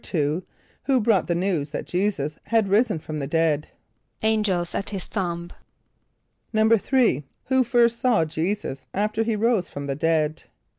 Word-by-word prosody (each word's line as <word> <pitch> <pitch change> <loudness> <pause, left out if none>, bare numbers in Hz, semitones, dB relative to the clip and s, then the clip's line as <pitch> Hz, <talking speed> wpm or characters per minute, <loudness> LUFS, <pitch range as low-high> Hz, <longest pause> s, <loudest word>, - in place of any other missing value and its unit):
= - - -9
Who 155 +1 0 0.6
brought 215 -4 +2
the 170 - +1
news 170 -5 0
that - - -5
J[=e]´[s+]us 175 -6 -1
had 220 -2 +2
risen 215 0 +3
from 155 0 -6
the 140 - -3
dead? 155 -1 +1 0.6
=Angels 210 -6 +1
at 195 - -2
his 195 -3 -5
tomb.= 175 -3 -3 1.0
=3.= 220 - +3 0.3
Who 260 -1 +4
first 235 -1 +3
saw 240 -10 +3
J[=e]´[s+]us 160 -4 -3
after 210 +2 0
he 225 0 0
rose 220 -4 +1
from 140 0 -6
the 140 - -2
dead? 160 +1 0
190 Hz, 150 wpm, -24 LUFS, 155-220 Hz, 1.0 s, Who